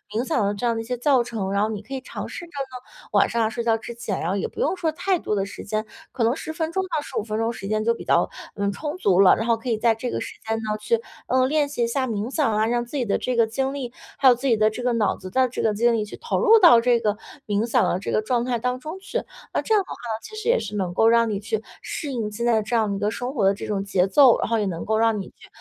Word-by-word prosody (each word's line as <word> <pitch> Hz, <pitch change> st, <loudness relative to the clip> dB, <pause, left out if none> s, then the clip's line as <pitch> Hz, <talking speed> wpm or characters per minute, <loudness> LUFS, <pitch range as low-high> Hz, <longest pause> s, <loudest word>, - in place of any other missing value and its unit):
冥 235 Hz, +3 st, 0 dB
想 260 Hz, -9 st, +1 dB
的 200 Hz, -, 0 dB
这 205 Hz, +4 st, -4 dB
样 235 Hz, -1 st, +2 dB
的 225 Hz, -, -2 dB
一 -, -, -6 dB
些 250 Hz, +1 st, -3 dB
教 255 Hz, -1 st, +3 dB
程， 215 Hz, -5 st, -4 dB
然 200 Hz, +1 st, +1 dB
后 215 Hz, -, +1 dB
你 210 Hz, -2 st, -4 dB
可 270 Hz, +6 st, -10 dB
以 265 Hz, -, -3 dB
尝 -, -, -6 dB
试 345 Hz, -, -7 dB
着 335 Hz, -, -19 dB
呢， 270 Hz, -, -8 dB
晚 -, -, +4 dB
上 235 Hz, -1 st, +1 dB
啊， 220 Hz, -, +1 dB
睡 235 Hz, +1 st, -4 dB
觉 225 Hz, -1 st, +2 dB
之 230 Hz, +2 st, -8 dB
前， 225 Hz, -5 st, -3 dB
然 165 Hz, -, -2 dB
后 195 Hz, -, 0 dB
也 -, -, -1 dB
不 -, -, -12 dB
用 -, -, +1 dB
说 335 Hz, -3 st, 0 dB
太 370 Hz, +4 st, 0 dB
多 210 Hz, -, -2 dB
的 195 Hz, -1 st, 0 dB
时 -, -, -9 dB
间， 215 Hz, +1 st, -2 dB, 0.3 s
可 240 Hz, -, -1 dB
能 235 Hz, +4 st, +2 dB
10 315 Hz, -, -6 dB
分 320 Hz, 0 st, -2 dB
钟 380 Hz, +2 st, 0 dB
到 300 Hz, -, 0 dB
15 215 Hz, -, -4 dB
分 215 Hz, -1 st, -3 dB
钟 225 Hz, +1 st, 0 dB
时 195 Hz, -4 st, -7 dB
间 215 Hz, +1 st, 0 dB
就 230 Hz, +1 st, +3 dB
比 -, -, -8 dB
较， -, -, +3 dB, 0.3 s
嗯， 200 Hz, -1 st, 0 dB
充 300 Hz, -, -5 dB
足 190 Hz, -, +2 dB
了。 190 Hz, -, +7 dB
然 225 Hz, -, -2 dB
后 230 Hz, -1 st, +3 dB
可 240 Hz, +2 st, -6 dB
以 225 Hz, -, +1 dB
在 225 Hz, 0 st, +3 dB
这 245 Hz, +2 st, -4 dB
个 -, -, -2 dB
时 -, -, -6 dB
间 225 Hz, 0 st, 0 dB
呢， 215 Hz, -1 st, -2 dB
去， 220 Hz, +2 st, 0 dB, 0.3 s
呃， 255 Hz, 0 st, +3 dB
练 295 Hz, 0 st, +2 dB
习 265 Hz, -4 st, -2 dB
一 -, -, +2 dB
下 260 Hz, +2 st, -1 dB
冥 215 Hz, 0 st, -2 dB
想 275 Hz, -9 st, +1 dB
啊， 215 Hz, -, +2 dB
让 240 Hz, 0 st, 0 dB
自 265 Hz, -, -10 dB
己 245 Hz, -, 0 dB
的 200 Hz, -, +1 dB
这 255 Hz, -, -2 dB
个 230 Hz, -1 st, +4 dB
精 265 Hz, +4 st, -2 dB
力， 255 Hz, -3 st, -5 dB, 0.2 s
还 275 Hz, -, +4 dB
有 250 Hz, -, +8 dB
自 270 Hz, +3 st, -3 dB
己 230 Hz, -, +4 dB
的 215 Hz, 0 st, +4 dB
这 245 Hz, +3 st, -6 dB
个 245 Hz, -1 st, +1 dB
脑 220 Hz, -3 st, +1 dB
子 185 Hz, -, -9 dB
的 260 Hz, -1 st, +3 dB
这 -, -, -4 dB
个 215 Hz, -, +2 dB
精 235 Hz, +3 st, +3 dB
力 220 Hz, -, +1 dB
去 -, -, -9 dB
投 470 Hz, -, -2 dB
入 455 Hz, -1 st, +6 dB
到 335 Hz, -, +8 dB
这 240 Hz, -1 st, +3 dB
个 210 Hz, -2 st, 0 dB, 0.3 s
冥 205 Hz, +2 st, +1 dB
想 235 Hz, -, +2 dB
的 180 Hz, -, 0 dB
这 -, -, -4 dB
个 215 Hz, -, +2 dB
状 240 Hz, +2 st, 0 dB
态 245 Hz, -2 st, -1 dB
当 250 Hz, +2 st, -1 dB
中 315 Hz, +8 st, -7 dB
去。 440 Hz, +5 st, -3 dB, 0.3 s
那 -, -, +1 dB
这 440 Hz, -, 0 dB
样 415 Hz, -, +5 dB
的 -, -, -24 dB
话 -, -, -6 dB
呢， 225 Hz, -2 st, -5 dB
其 435 Hz, -, -10 dB
实 435 Hz, +2 st, -3 dB
也 -, -, +4 dB
是 210 Hz, -, -6 dB
能 185 Hz, -3 st, -2 dB
够 225 Hz, +4 st, +4 dB
让 230 Hz, 0 st, +4 dB
你 205 Hz, -2 st, -2 dB
去 220 Hz, +1 st, -3 dB, 0.2 s
适 290 Hz, -4 st, -5 dB
应 220 Hz, -4 st, -3 dB
现 235 Hz, +3 st, -3 dB
在 240 Hz, -, +3 dB
的 220 Hz, -, +1 dB
这 235 Hz, -, -2 dB
样 215 Hz, -3 st, +1 dB
一 -, -, -4 dB
个 205 Hz, +1 st, +1 dB
生 245 Hz, +3 st, -4 dB
活 210 Hz, -8 st, +1 dB
的 195 Hz, -, +5 dB
这 200 Hz, -, -7 dB
种 195 Hz, -2 st, -1 dB
节 195 Hz, -2 st, +1 dB
奏， 265 Hz, +2 st, +6 dB
然 -, -, -1 dB
后 230 Hz, -1 st, +2 dB
也 210 Hz, -, 0 dB
能 170 Hz, -4 st, -4 dB
够 220 Hz, 0 st, +1 dB
让 225 Hz, -2 st, +2 dB
你 -, -, -8 dB
去， -, -, -18 dB
230 Hz, 350 characters per minute, -23 LUFS, 215-260 Hz, 0.3 s, 有